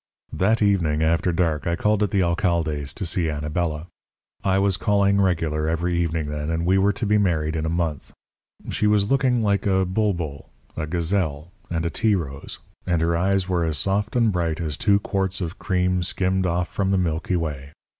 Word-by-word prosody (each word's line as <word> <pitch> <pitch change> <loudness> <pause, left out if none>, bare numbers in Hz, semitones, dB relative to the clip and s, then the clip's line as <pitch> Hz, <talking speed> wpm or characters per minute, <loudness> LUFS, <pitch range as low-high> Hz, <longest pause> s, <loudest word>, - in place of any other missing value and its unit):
"That 110 +4 +2
evening 85 -7 +2
after 85 +3 +2
dark 80 -3 0
I 85 - +1
called 105 +3 +1
at 105 - +2
the 95 -3 +2
alcalde's 85 -5 0
to 95 - -3
see 85 -1 0
Anabela. 75 +1 -2 0.6
I 95 0 +2
was 100 -1 +2
calling 100 0 +2
regular 80 -4 0
every 85 +2 0
evening 80 -2 -1
then, 75 +1 -3
and 80 +1 -1
we 95 +2 +3
were 100 +2 +3
to 110 - -4
be 105 +1 +3
married 80 -5 0
in 80 0 -1
a - - -1
month. 80 -3 -2 0.6
She 105 - +1
was 105 +1 +2
looking 130 -4 +2
like 100 -1 +1
a 95 -1 +2
bulbul, 90 -7 -2 0.3
a 80 -1 -3
gazelle, 85 -2 -1 0.2
and 85 -1 -2
a 85 - -1
tea 110 +2 +2
rose, 70 -6 -5 0.3
and 85 -2 +2
her 85 +1 +1
eyes 95 +2 +1
were 90 -2 0
as 80 -2 0
soft 100 +3 -1
and 115 -3 +3
bright 85 -4 -1
as 80 -3 -2
two 100 +5 +3
quarts 95 -2 -1
of 90 -1 -5
cream 90 -1 0
skimmed 95 +1 0
off 85 +1 0
from 95 -1 -1
the 95 - +2
Milky 85 0 -1
Way. 75 -5 -3
90 Hz, 195 wpm, -23 LUFS, 80-100 Hz, 0.6 s, we